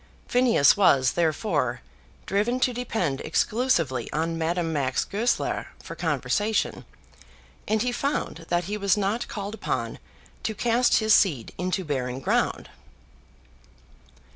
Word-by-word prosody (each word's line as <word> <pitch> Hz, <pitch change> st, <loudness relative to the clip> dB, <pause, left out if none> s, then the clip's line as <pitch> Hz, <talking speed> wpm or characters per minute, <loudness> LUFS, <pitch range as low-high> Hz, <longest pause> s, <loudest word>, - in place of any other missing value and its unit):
Phineas 245 Hz, -, +4 dB
was, 135 Hz, -10 st, +4 dB
therefore, 170 Hz, +5 st, 0 dB, 0.4 s
driven 215 Hz, +6 st, 0 dB
to 250 Hz, -, +2 dB
depend 220 Hz, -, -2 dB
exclusively 165 Hz, -, 0 dB
on 165 Hz, +2 st, -1 dB
Madame 165 Hz, 0 st, -1 dB
Max 135 Hz, -3 st, 0 dB
Goesler 225 Hz, +5 st, -1 dB
for -, -, -9 dB
conversation, 215 Hz, +1 st, -1 dB, 0.8 s
and 215 Hz, 0 st, +1 dB
he 250 Hz, -, 0 dB
found 245 Hz, -, -3 dB
that 175 Hz, 0 st, +1 dB
he 205 Hz, +4 st, -3 dB
was 200 Hz, -1 st, +2 dB
not 205 Hz, +4 st, -1 dB
called 200 Hz, 0 st, -5 dB
upon 220 Hz, -, -3 dB, 0.4 s
to 220 Hz, -, -3 dB
cast 240 Hz, +3 st, +3 dB
his 220 Hz, -1 st, +3 dB
seed 150 Hz, -, +2 dB
into 185 Hz, 0 st, -1 dB
barren 130 Hz, -3 st, -2 dB
ground. -, -, 0 dB
195 Hz, 120 wpm, -25 LUFS, 160-220 Hz, 0.8 s, Phineas